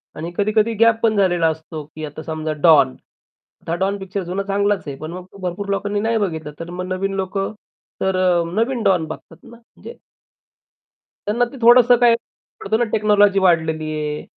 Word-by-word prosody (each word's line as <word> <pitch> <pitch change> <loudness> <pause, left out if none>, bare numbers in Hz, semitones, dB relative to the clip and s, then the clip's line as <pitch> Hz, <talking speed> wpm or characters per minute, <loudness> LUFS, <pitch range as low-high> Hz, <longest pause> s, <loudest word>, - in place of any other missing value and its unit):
आणि 165 +3 -6
कधी-कधी 215 +2 +1
गॅप 230 -1 +4
पण 220 -2 +2
झालेला 175 -4 +2
असतो, 160 -1 -5
की 155 +1 -8
आता 150 +1 -8
समजा 155 -1 -3
डॉन. 155 - +6 0.7
आता 165 - -6
हा - - +1
डॉन 195 +2 -1
पिक्चर 190 0 -5
जुना 185 +3 -3
चांगलाच 200 0 0
आहे. 140 - -5
पण 155 +1 -7
मग 180 +1 -8
तो - - -15
भरपूर 185 +3 -4
लोकांनी 205 +1 -1
नाही 225 +1 0
बघितला, 160 -7 -3
तर 165 +1 -7
मग 180 +1 -5
नवीन 195 +1 -2
लोक 190 +1 -3 0.6
तर 190 -1 +1
अ, 180 -2 +2
नवीन 230 +2 0
डॉन 180 -4 +2
बघतात 160 +1 -10
ना, - - -15
म्हणजे 240 - -14 1.3
त्यांना 235 +4 +2
ते - - -9
थोडंसं 245 +1 +7
काही 240 -1 +6 0.5
पडतं 220 +3 0
ना 240 - +2
टेक्नॉलॉजी 205 -2 +3
वाढलेली 160 -4 +2
आहे 150 0 -3
190 Hz, 185 wpm, -20 LUFS, 165-210 Hz, 1.3 s, थोडंसं